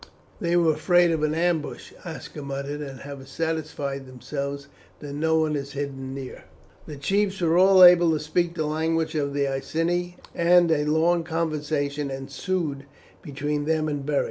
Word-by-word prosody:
"They 170 0 0
were 165 -2 +4
afraid 175 +2 +3
of 160 -2 0
an 155 0 +1
ambush," 165 -2 -1
Aska 160 -3 -8
muttered, 140 +1 -5
"and 135 -3 -7
have 140 -1 -9
satisfied 145 -3 -3
themselves 140 +2 -5 0.3
that 145 -2 -7
no 160 +2 +1
one 155 -1 +1
is 140 0 -5
hidden 135 -2 -5
near." 135 -2 -8 0.4
The 150 - -7
chiefs 195 +6 0
were 165 -2 +2
all 185 +1 +7
able 175 -1 +8
to 155 - 0
speak 170 +3 -1
the 155 - -1
language 160 +1 0
of 140 -2 -1
the 140 -1 +1
Iceni, 165 +6 -2 0.2
and 175 0 +4
a 150 -2 +2
long 165 +3 +2
conversation 150 -3 -2
ensued 140 +2 -3 0.4
between 145 0 -3
them 155 0 +1
and 145 -2 -3
Beric. 145 0 +1
155 Hz, 165 wpm, -25 LUFS, 140-170 Hz, 0.4 s, able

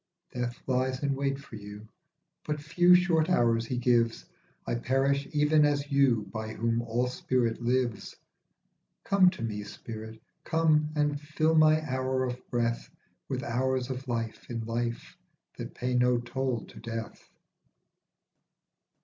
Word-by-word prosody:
Death 120 -1 -3
lies 130 +1 0
in 140 -1 +1
wait 135 0 -1
for 140 -5 -10
you, 105 +1 -10 0.6
but 150 -1 -3
few 175 +4 +5
short 175 -2 +3
hours 115 -8 +2
he 125 - -2
gives; 120 -2 +2 0.4
I - - -2
perish 135 +3 +1
even 150 0 +4
as 145 0 +1
you 135 -6 +3
by 110 0 -4
whom 115 +1 0
all 120 +1 0
spirit 125 -2 -1
lives. 120 -2 -1 0.9
Come 190 -2 +5
to 185 -6 -7
me, 105 -2 -3
spirit, 110 +2 -8 0.2
come, 155 -2 +2
and 145 -1 0
fill 155 +1 +1
my 155 0 +4
hour 130 0 0
of 125 0 -3
breath 115 -1 -1 0.4
With - - -2
hours 130 +1 -1
of 130 +1 -6
life 115 -2 -4
in 115 -2 -4
life 115 - -3 0.4
that - - -6
pay 125 0 -2
no 125 0 +3
toll 125 0 -2
to - - -13
death. 115 -1 -7
125 Hz, 140 wpm, -29 LUFS, 115-145 Hz, 0.9 s, few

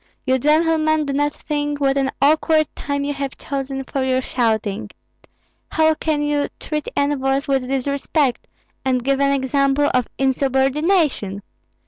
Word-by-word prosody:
You 260 0 +2
gentlemen 310 +1 +2
do 280 - -2
not 290 +1 +1
think 290 -1 -3
what 275 -1 +2
an 270 -1 +1
awkward 310 +1 +3
time 285 0 -3
you 290 0 -1
have 275 -1 -5
chosen 270 -1 -4
for 270 0 -3
your 260 0 +1
shouting. 220 -4 -1 0.8
How 315 0 +3
can 305 -1 -1
you 295 -1 0
treat 300 -1 -4
envoys 275 -1 +1
with 270 -2 0
disrespect, 275 0 -1 0.4
and 255 -2 0
give 275 +1 +1
an 280 0 +3
example 275 +1 +2
of 250 -2 +1
insubordination? 270 - +1
275 Hz, 140 wpm, -20 LUFS, 265-295 Hz, 0.8 s, awkward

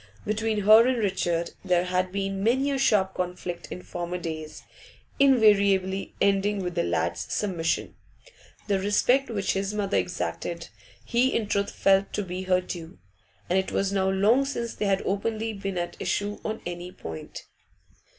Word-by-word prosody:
Between 215 0 0
her 215 +4 +7
and 255 -1 +1
Richard 175 -5 0
there 180 -2 +2
had 180 0 0
been 195 0 -2
many 265 +6 +2
a 275 - -1
sharp 195 -7 +3
conflict 180 -1 -4
in 180 - -6
former 175 0 -4
days, 160 -3 -6 0.6
invariably 200 -7 +4
ending 200 0 +2
with 180 -1 -3
the 170 - +1
lad's - - -1
submission; 175 -5 -1 0.7
the 200 -2 +1
respect 245 +7 +2
which 205 -4 -1
his 195 +2 -2
mother 205 -1 0
exacted 170 -1 -3 0.4
he 245 +2 +2
in 225 - +1
truth 200 0 0
felt 195 0 +2
to 205 - -1
be 180 0 -5
her 185 0 +3
due, 170 -2 -8 0.5
and 185 +2 +2
it 190 - -3
was 195 0 0
now 190 -1 +2
long 210 +8 +4
since 235 -4 -3
they 210 - -3
had 195 -1 +1
openly 220 +3 -1
been 195 -2 -4
at 175 0 -3
issue 205 0 -2
on 220 0 -4
any 175 +1 -5
point. 80 - -8
195 Hz, 160 wpm, -26 LUFS, 180-215 Hz, 0.7 s, her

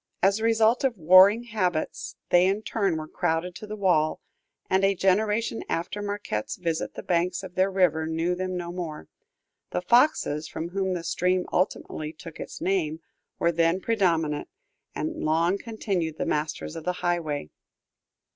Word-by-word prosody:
As 195 +2 +4
the 220 - -5
result 225 +2 +3
of 255 -5 +1
warring 185 +7 +7
habits, 185 -9 -2 0.2
they 175 +1 +6
in 200 +3 0
turn 195 -8 0
were 155 0 -5
crowded 165 +3 -1
to 215 - -9
the 210 - -5
wall, 175 -7 +2 0.5
and 190 +1 +2
a 195 0 +3
generation 210 +5 +1
after 180 +5 -2
Marquette's 205 - -3
visit 165 -3 -3
the - - -7
banks 175 +1 0
of 185 -2 -8
their 185 +1 +2
river 175 -5 +2
knew 165 +2 0
them 185 0 -3
no 175 -1 -4
more; 165 - -6 0.6
the 180 - -3
Foxes, 235 - +3
from 165 +2 -5
whom 190 0 -1
the 170 - -4
stream 180 +2 +1
ultimately 155 -4 -1
took 165 0 -11
its - - -7
name, 170 -4 0 0.4
were 170 - +2
then 165 +2 +2
predominant, 170 -8 0 0.5
and 320 0 -3
long 165 +5 +2
continued 195 -9 -3
the - - -2
masters 150 +1 -2
of 165 - -6
the 180 - 0
highway. 155 - -1
180 Hz, 165 wpm, -26 LUFS, 165-200 Hz, 0.6 s, warring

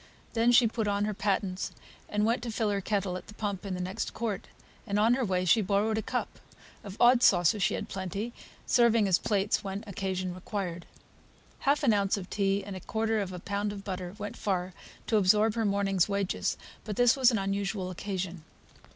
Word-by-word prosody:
Then 235 +1 +3
she 245 0 +6
put 220 -1 -2
on 205 0 +1
her 215 - -1
pattens, 195 -2 -1 0.4
and 210 0 +1
went 230 +1 +1
to 240 -2 -4
fill 220 -1 0
her 200 -1 -1
kettle 195 -2 -1
at 180 - -11
the 210 - -12
pump 200 -2 -3
in 190 - -2
the - - -5
next 185 +4 -4
court, 220 -5 -3 0.4
and 200 - 0
on 220 +3 +4
the 260 +1 +1
way 185 -4 0
she 200 +6 +5
borrowed 205 +3 +1
a - - -1
cup; - - -3 0.4
of 200 0 -8
odd 245 0 +6
saucers 180 0 +4
she - - +2
had - - -4
plenty, 195 +5 -4 0.3
serving 230 -3 +4
as 185 -2 +3
plates 205 -1 0
when 195 +2 -4
occasion 190 -2 -3
required. 180 -2 -5 0.8
Half 290 +2 +3
an 235 -6 +5
ounce 200 0 +1
of 185 -2 -8
tea 200 -1 +1
and 200 - -6
a - - -5
quarter 220 +3 -1
of 190 -2 -4
a 180 - -6
pound 200 +3 -2
of 200 -1 -7
butter 185 -1 -5
went 205 -1 -5
far 185 -2 -1 0.3
to 220 - +2
absorb 210 +2 +4
her 225 -1 0
morning's 195 -2 +1
wages; 200 -1 -1 0.3
but 210 -2 -5
this 245 +1 +5
was 260 -3 +5
an 230 - +1
unusual 195 -1 -2
occasion. 185 -2 -4
200 Hz, 205 wpm, -29 LUFS, 190-220 Hz, 0.8 s, she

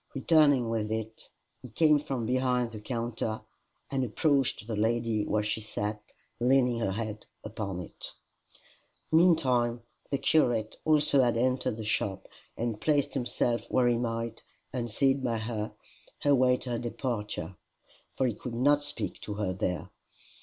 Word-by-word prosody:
Returning 145 -3 +4
with 110 -1 -1
it 110 0 -5 0.3
he 125 - -10
came 150 +5 +4
from 135 -5 -3
behind 125 -1 +1
the 110 -2 -8
counter, 115 -2 -3 0.5
and 135 -1 0
approached 135 0 +1
the 115 -1 -3
lady 110 0 0
where 105 0 +1
she 105 +1 -1
sat 105 0 -3 0.4
leaning 125 -1 +3
her 95 -4 0
head 110 0 -5 0.2
upon 100 -4 -4
it. 90 - -8 1.0
Meantime 130 -9 +3 0.3
the 140 - +1
curate 120 -8 +2
also 150 -3 +4
had 120 -2 +2
entered 125 -2 +1
the 110 - -5
shop, 100 -2 -1 0.3
and 115 -2 -2
placed 145 -3 +2
himself 120 -2 -1
where 125 -1 +3
he 120 -1 +2
might, 115 -1 -3 0.3
unseen 135 +3 +1
by 120 -3 0
her, 110 -1 -3 0.5
await 130 -3 +4
her 120 -2 -2
departure, 105 - -4 0.6
for 130 - 0
he 120 - +1
could 115 +3 -7
not 145 +4 +4
speak 115 -9 -4
to 105 - -5
her 100 -3 -1
there. 90 -2 -3
120 Hz, 145 wpm, -29 LUFS, 110-130 Hz, 1.0 s, Returning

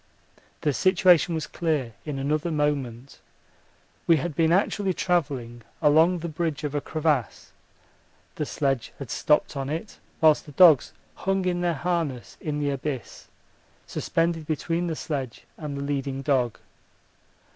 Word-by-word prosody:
The 150 - +1
situation 180 -1 +4
was 155 -1 -2
clear 150 -9 -2
in 150 -3 -4
another 150 +4 -1
moment. 140 -5 -2 0.9
We 165 - +6
had 155 +1 -3
been 165 +1 +3
actually 190 0 +1
travelling 135 -9 -1 0.2
along 160 +4 +4
the 170 0 -5
bridge 160 -1 -3
of 150 -1 -3
a 145 - -1
crevasse, 155 -6 -1 0.8
the - - -3
sledge 135 -4 -1
had 135 -5 -7
stopped 150 0 +2
on 135 0 -3
it, 165 +7 -5 0.2
whilst 155 -1 +4
the 145 - -11
dogs 160 -5 +6 0.2
hung 195 0 -1
in 175 -1 0
their 175 -2 +1
harness 160 -6 -2
in 150 -1 -2
the 145 -1 0
abyss, 140 -2 -5 0.6
suspended 165 -2 -1
between 165 +3 -1
the 165 - -2
sledge 135 -7 -4
and 150 -3 -6
the 140 - -3
leading 135 -1 -3
dog. 130 -5 +1
150 Hz, 145 wpm, -25 LUFS, 140-170 Hz, 0.9 s, We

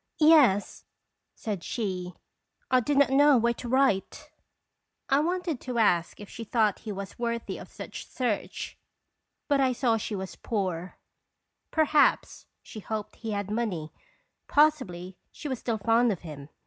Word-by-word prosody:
" - - -37 0.2
Yes," 205 -10 +3 0.5
said 205 -6 -4
she. 185 -6 -3 0.6
"I 255 - +6
did 280 +4 0
not 280 -2 +5
know 285 0 +6
where 235 +1 +2
to 240 0 -7
write." 265 +3 +1 0.8
I 275 0 +4
wanted 345 -2 -1
to 250 -2 -4
ask 175 -7 +2
if 205 - -9
she 230 - -8
thought 215 -2 +1
he 215 - -6
was 200 +1 -7
worthy 235 -1 -3
of - - -11
such - - -8
search, 240 -6 -3 0.7
but 285 -2 +3
I 260 -1 +3
saw 235 -2 +1
she 215 0 -4
was 190 -1 -5
Second - - -16
Qlarir 200 -6 0
tiOins." 170 +3 -8 0.8
239 - - -18
poor. 315 - +6
Perhaps 300 0 +2 0.2
she 215 - -9
hoped 215 0 -5
he 225 - -6
had 200 0 -3
money. 200 -9 -2 0.5
Pos 305 +1 +5
sibly 180 -4 -8
she - - -7
was 260 -4 -3
still 230 -2 -2
fond 230 +2 +3
of 190 - -4
him. 150 -4 -9
225 Hz, 175 wpm, -28 LUFS, 195-265 Hz, 0.8 s, I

